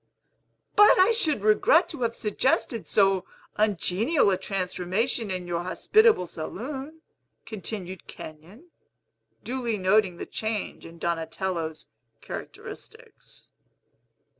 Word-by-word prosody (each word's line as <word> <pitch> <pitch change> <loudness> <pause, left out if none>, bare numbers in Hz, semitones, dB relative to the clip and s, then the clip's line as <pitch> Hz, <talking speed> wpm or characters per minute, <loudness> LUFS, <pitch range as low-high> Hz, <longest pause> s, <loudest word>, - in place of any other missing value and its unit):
"But 415 +1 +7
I 375 +5 +6
should 310 - +1
regret 215 - +4
to 310 -6 -7
have 230 -1 0
suggested 230 +2 0
so 195 -2 +3 0.3
ungenial 210 - +2
a - - +3
transformation 195 +4 -1
in 185 -1 -3
your 170 -1 -2
hospitable 430 - +3
saloon," 270 - -7 0.4
continued 190 -4 -6
Kenyon, 185 - -11 0.7
duly 240 -3 -2
noting 190 -1 +2
the - - -5
change 220 -5 -4
in 165 0 -13
Donatello's 165 -1 -3 0.3
characteristics. - - -10
210 Hz, 100 wpm, -26 LUFS, 180-255 Hz, 0.7 s, But